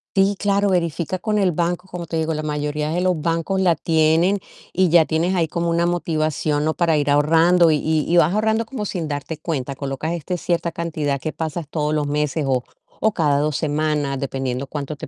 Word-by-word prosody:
Sí, 195 +1 +3
claro, 200 0 +2
verifica 175 0 -1
con 215 +1 -1
el 195 -3 +3
banco, 175 +2 -2
como 175 -2 -7
te 165 - -3
digo, 160 0 0
la 155 - -3
mayoría 150 0 -2
de 170 +3 -1
los 180 -4 +1
bancos 165 +4 0
la 175 -3 +3
tienen 165 +5 +2 0.3
y 185 -1 +3
ya 165 -1 +6
tienes 170 +4 0
ahí 165 -2 +1
como 170 +2 -2
una 170 +1 +2
motivación, 155 -3 0
¿no? 155 - +1
Para 165 -2 +2
ir 145 -1 +1
ahorrando 165 +4 +4
y 155 - +3 0.3
y 175 - +2
vas 170 +1 +4
ahorrando 220 +2 +1
como 220 -3 -5
sin 175 -5 -3
darte 145 +2 -4
cuenta. 140 -4 -3
Colocas 140 +4 -3
este 175 +2 -3
cierta 170 0 -1
cantidad 155 -4 -2
que 155 - -3
pasas 160 -1 -4
todos 150 -1 -1
los 150 -1 0
meses, 150 +1 -1
o 130 -2 +1 0.4
o 220 -1 +2
cada 145 -4 +2
2 150 0 0
semanas, 150 -1 -1
dependiendo 135 -1 -3
cuánto 150 0 -5
te - - -8
160 Hz, 205 wpm, -21 LUFS, 150-175 Hz, 0.4 s, ya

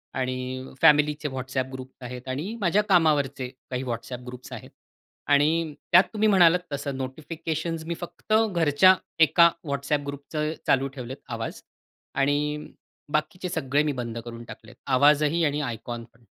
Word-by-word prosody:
आणि 130 0 -3
फॅमिलीचे 150 -1 +4
WhatsApp 130 0 -3
groups 130 0 -10
आहेत 125 +1 -8
आणि 155 - -3
माझ्या 190 +2 +3
कामावरचे 145 -7 +2 0.2
काही 125 0 -3
WhatsApp 125 0 -5
ग्रुप्स 125 0 -9
आहेत. - - -9 0.6
आणि 155 +2 +3 0.2
त्यात 175 +2 +8
तुम्ही 215 0 +2
म्हणालात 180 -3 +6
तसं 140 0 -3
नोटिफिकेशन्स 160 +4 -4
मी 170 +1 -3
फक्त 175 +4 -5 0.2
घरच्या 170 +2 +5 0.3
एका 170 +2 +6 0.2
WhatsApp 140 +1 -1
ग्रुपचे 150 +2 -3
चालू 135 0 +3
ठेवलेत 130 0 -6 0.2
आवाज 115 0 -5 0.6
आणि 150 +2 0 0.5
बाकीचे 180 +4 -1
सगळे 140 -2 +1
मी 150 - 0
बंद 120 -3 -5
करून 120 0 -8
टाकलेत, - - -12
आवाजही 145 +4 +4
आणि 145 0 0
आयकॉन 120 -2 -5
पण. 115 0 -26
145 Hz, 140 wpm, -26 LUFS, 130-160 Hz, 0.6 s, त्यात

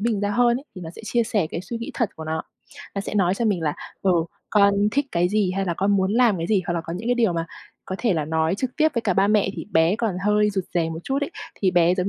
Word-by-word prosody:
mình 215 -2 0
ra 205 - 0
hơn 240 +2 +3
ấy, 275 - -13
thì - - -6
nó 160 - -6
sẽ 175 - -12
chia 235 +2 +1
sẻ 205 -6 0
cái 165 - -3
suy 230 +5 -6
nghĩ 230 - -5
thật 235 -5 0
của 160 - -7
nó. 160 +1 -2 0.5
Nó 200 - -1
sẽ 200 - -5
nói 190 -2 +3
cho 235 - -2
mình 200 -6 +1
là, 150 -2 0 0.3
ừ, 190 - +3 0.4
con 200 -1 +5 0.2
thích 285 0 +1
cái 175 +1 +2
gì, 205 -2 +1
hay 195 - 0
là 170 -2 -1
con 195 +3 +1
muốn 190 +1 +1
làm 235 -3 +4
cái 165 - -2
gì, 200 -2 +2
hoặc 175 - -1
là 170 - 0
có 165 +1 -7
những 215 +6 -4
cái 245 - +3
điều 230 -6 +2
mà 165 0 -2 0.4
có 190 - -4
thể 225 -6 +1
là 155 -3 0
nói 160 +2 +1
trực 250 +4 -4
tiếp 315 0 +4
với 235 - 0
cả 195 -4 +1
ba 195 +1 +4
mẹ 210 -2 +3
thì - - -6
bé 165 +5 +4
còn 220 -6 -1
hơi 210 0 +3
rụt 190 -2 -2
rè 165 -2 +1
một 160 - -5
chút 275 +1 -1
ấy. 285 - -2 0.2
Thì 190 -2 +1
bé 175 0 +4
giống 185 0 -1
195 Hz, 310 wpm, -23 LUFS, 175-225 Hz, 0.5 s, con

